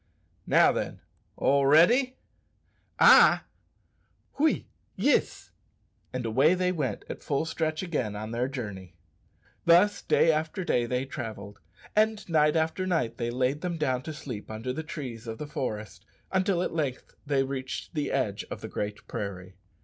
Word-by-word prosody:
"Now - - +5
then, - - -4 0.4
all 140 0 +3
ready?" 240 - +5 0.8
"Ay" - - +8 1.0
"Oui, 315 +2 +2 0.3
yis!" - - +1 0.6
And 125 -1 -4
away 135 +10 +4
they 180 0 +1
went 140 - -3
at - - -7
full 145 +2 -1
stretch 160 0 -2
again 130 - -2
on 110 +1 -5
their 120 +2 -1
journey. 105 -9 -7 0.7
Thus 180 +5 +5
day 165 - +4
after 160 +4 -2
day 120 -8 +1
they 125 +2 -1
travelled, 110 -6 -7 0.4
and 215 -1 +2
night 150 -2 +3
after 160 +4 0
night 125 -11 -1
they 120 -1 -1
laid 130 +4 0
them 175 -2 -3
down 130 -5 0
to 155 - -6
sleep 130 -8 -7
under 110 +4 -4
the 160 - -3
trees 125 -7 -7
of 110 0 -5
the 150 - -5
forest, 110 - -5 0.3
until 185 -1 +1
at - - -3
length 145 -6 -3
they 140 -2 +2
reached 135 +2 -5
the 150 -3 -2
edge 110 -7 -1
of - - -6
the - - -5
Great 105 0 -5
Prairie. 95 -2 -6
140 Hz, 155 wpm, -28 LUFS, 115-165 Hz, 1.0 s, Ay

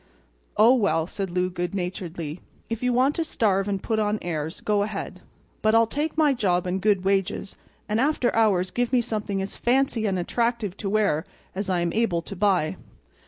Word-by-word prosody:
"Oh, 225 +4 +7
well," 200 -10 +2
said 195 +2 -4
Lou, 180 +1 0
good 175 +2 -3
naturedly, 175 -3 -4 0.3
"if 230 - -2
you 250 0 +1
want 255 +4 +3
to 330 - +1
starve 200 -10 +1
and 195 -2 -2
put 220 -2 0
on 210 0 +1
airs, 160 -1 -3
go 210 -1 +1
ahead. 205 -1 -4 0.4
But 215 +1 +3
I'll 230 0 +6
take 295 +7 -3
my 300 -3 +4
job 185 -7 +1
and 185 +1 -2
good 200 -2 +2
wages; 195 0 0 0.3
and 215 +1 0
after 275 -3 +1
hours 195 -5 +2
give 245 0 -1
me 250 -2 +4
something 210 -4 -2
as 195 - -6
fancy 250 -3 +1
and 190 -2 0
attractive 230 +1 -1
to 200 - -3
wear 200 -7 +2 0.3
as 195 +1 -3
I 180 -2 +1
am 170 -1 -1
able 200 -7 +1
to 200 - -7
buy." 185 -5 +1
205 Hz, 195 wpm, -25 LUFS, 180-230 Hz, 0.4 s, Oh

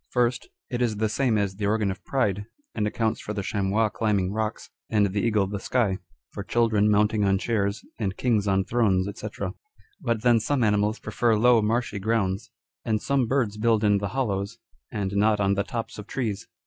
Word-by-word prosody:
First, 125 0 0 0.2
it 120 -1 -2
is 115 -3 +1
the 110 +1 +1
same 115 +1 +1
as 100 -2 -1
the 100 -1 -1
organ 105 -1 +1
of 95 -1 -8
pride, 105 -7 0 0.3
and 105 - 0
accounts 110 +1 -1
for 105 - -5
the 100 - -2
chamois 105 +2 +1
climbing 105 -4 0
rocks, 110 0 -3 0.2
and 105 -2 +3
the 100 +1 -1
eagle 110 -4 +2
the 100 +1 -4
sky; 105 -4 0 0.3
for - - -6
children 105 0 +2
mounting 105 0 +3
on 95 -1 +3
chairs, 100 -1 -1 0.2
and 100 -4 -2
kings 110 -5 +1
on 95 -1 +2
thrones, 100 -6 +2
&c. - - -4 0.7
But 115 -2 -1
then 120 -2 +5
some 130 +3 0
animals 105 +1 +2
prefer 115 -2 +1
low 120 +1 +5
marshy 110 0 0
grounds, 100 +1 -1 0.3
and 110 -2 0
some 135 0 +1
birds 115 -5 0
build 110 0 +2
in 105 -1 +4
the 100 - -2
hollows, 100 -6 -2 0.3
and 100 -3 -2
not 105 +1 +3
on 100 -1 +2
the 100 - +1
tops 115 0 -5
of 105 - -8
trees. 110 -6 -3
105 Hz, 195 wpm, -25 LUFS, 100-115 Hz, 0.7 s, then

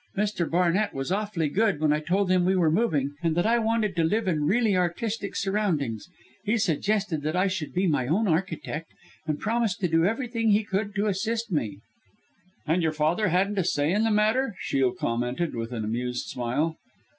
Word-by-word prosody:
Mr. 200 -5 0
Barnett 180 +4 +1
was 135 +5 -3
awfully 200 -5 -1
good, 200 +1 +1
when 150 -1 +3
I 150 - +1
told 185 +4 0
him 185 -1 +3
we 185 +2 +2
were 170 -4 +3
moving, 155 - +1
and 165 -2 0
that 175 - +2
I 235 +2 +3
wanted 220 -3 0
to 165 - +2
live 210 +6 +1
in 155 -5 +1
really 220 0 +2
artistic 200 +4 -2
surroundings 175 - -1 0.3
he 215 +2 +1
suggested 200 -2 0
that 155 +3 -2
I 185 +1 +3
should 185 -5 -2
be 185 +2 0
my 145 -7 +1
own 200 - +1
architect, 160 -2 -2 0.4
and 150 -1 -1
promised 225 -3 0
to 180 - +2
do 165 0 +2
everything 230 +1 0
he 210 +1 +4
could 200 0 -2
to 205 +1 +1
assist 220 +3 -1
me," 105 - -2 0.8
"And 165 +4 +1
your 160 -1 +1
father 160 +7 +1
hadn't 190 +3 +1
a - - +2
say 145 -2 +1
in 210 +2 +2
the 225 - +2
matter," 220 +3 +2
Shiel 135 -2 +1
commented, 120 +8 -2
with 115 0 -4
an 115 -3 -3
amused 125 +3 -2
smile. 140 +7 -2
180 Hz, 195 wpm, -26 LUFS, 155-210 Hz, 0.8 s, he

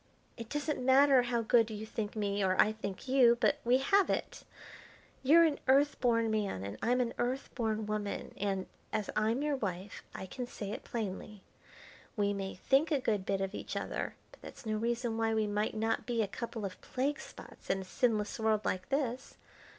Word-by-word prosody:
It 230 -2 -8
doesn't 295 -2 -2
matter 265 0 +6
how 240 -1 -1
good 230 0 +4
you 215 0 -5
think 220 -1 -4
me 205 -1 0
or 185 -1 +1
I 215 - +6
think 210 0 -6
you, 250 -3 +5
but - - +2
we 245 +2 +4
have 390 +9 +3
it. - - -2 0.8
You're 315 +6 +7
an 310 -3 +2
Earth 280 +3 +4
born 230 -3 +2
man 205 - -1
and 100 +1 -6
I'm 250 +2 +2
an 235 -1 -1
Earth 255 +3 -2
born 220 -2 -1
woman, 210 -1 -3
and, 195 -2 -1 0.3
as 215 -2 -2
I'm 225 +6 +1
your 295 -1 +1
wife, 195 -3 -4
I - - -5
can 245 +6 -6
say 205 -4 -6
it - - -6
plainly. 210 -2 -5 0.7
We 205 -1 +2
may 195 -1 -4
think 270 - +2
a 295 -4 +2
good 210 -6 -1
bit 195 -1 0
of 195 +1 -2
each - - -6
other, - - -3 0.2
but - - -18
that's - - -11
no 215 -1 -1
reason 235 0 -1
why 225 0 +1
we 220 -1 +2
might 210 +1 -1
not 225 +1 -1
be 235 -2 +1
a - - -2
couple 225 0 -5
of 185 -2 -7
plague 280 +4 -1
spots - - -12
in 195 - +1
a - - -8
sinless 215 +1 0
world 220 -1 +1
like 185 0 -2
this. 265 -2 -2
225 Hz, 200 wpm, -32 LUFS, 205-255 Hz, 0.8 s, You're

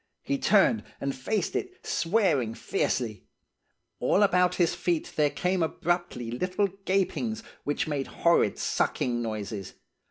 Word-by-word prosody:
He 280 -1 -1
turned 215 0 +4 0.2
and 140 0 -2
faced 185 +9 -1
it, 370 -1 -4
swearing 165 - +1
fiercely. 110 -4 -2 0.7
All 205 - +3
about 180 -2 +3
his 175 -2 +2
feet 170 -3 -1
there 150 -1 +3
came 180 +4 0
abruptly 165 -7 -1
little 185 - 0 0.2
gapings, 220 +4 0 0.2
which 145 +2 -1
made 145 -3 -2
horrid 170 -11 +2
sucking 120 -1 0
noises. 105 -3 -5
170 Hz, 125 wpm, -28 LUFS, 125-195 Hz, 0.7 s, turned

